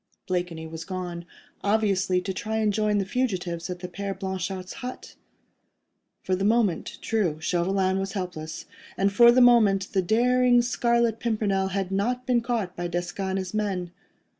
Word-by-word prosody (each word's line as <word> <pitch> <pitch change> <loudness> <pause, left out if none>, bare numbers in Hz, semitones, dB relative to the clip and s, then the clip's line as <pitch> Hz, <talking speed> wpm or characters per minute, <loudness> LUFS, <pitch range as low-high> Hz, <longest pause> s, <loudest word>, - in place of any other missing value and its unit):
Blakeney 175 -3 -2
was 160 0 -7
gone, 175 -1 -5 0.4
obviously 200 -3 +2
to 190 +1 -3
try 220 +3 -3
and 215 -2 +1
join 210 0 +1
the 195 - 0
fugitives 185 -7 -2
at 180 -1 -5
the 180 - -4
Père 195 +2 -5
Blanchard's 190 -1 -4
hut. 250 0 -7 1.1
For 185 - 0
the 190 - -2
moment, 215 -4 +1
true, 185 -9 0
Chauvelin 185 +3 +1
was 195 0 -3
helpless; 175 -5 -5 0.5
for 235 +4 +7
the 255 +1 +4
moment 215 -6 +5
the 190 - +3
daring 245 +5 +3
Scarlet 235 -2 +1
Pimpernel 210 -4 0
had 190 -1 -2
not 245 +6 -1
been 245 -2 +2
caught 230 -7 -2
by 175 0 -3
Desgas 175 +3 -3
and 190 - -1
his 185 0 -4
men. 195 -5 -2
195 Hz, 160 wpm, -26 LUFS, 180-220 Hz, 1.1 s, for